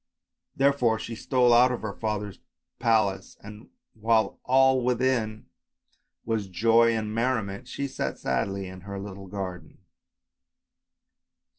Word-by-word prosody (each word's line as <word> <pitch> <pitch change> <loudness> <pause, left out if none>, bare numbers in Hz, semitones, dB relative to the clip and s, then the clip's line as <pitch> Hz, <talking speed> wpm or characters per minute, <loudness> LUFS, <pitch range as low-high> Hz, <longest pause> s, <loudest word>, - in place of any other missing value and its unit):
Therefore 135 -5 +2
she 115 - -6
stole 125 +1 +2
out 125 +2 +6
of 125 - -4
her 105 -2 -3
father's 105 -2 -4 0.4
palace, 110 -5 +1
and 105 +2 -11 0.2
while 110 0 +1
all 130 0 +4
within 120 -3 0 0.8
was 110 -3 -1
joy 115 +5 +3
and 110 -1 -3
merriment, 110 -4 -1
she 140 - -4
sat - - -4
sadly 100 -1 -2
in 95 0 -10
her 100 +1 -7
little 95 -1 -8
garden. 90 -4 -7
110 Hz, 120 wpm, -26 LUFS, 100-120 Hz, 0.8 s, out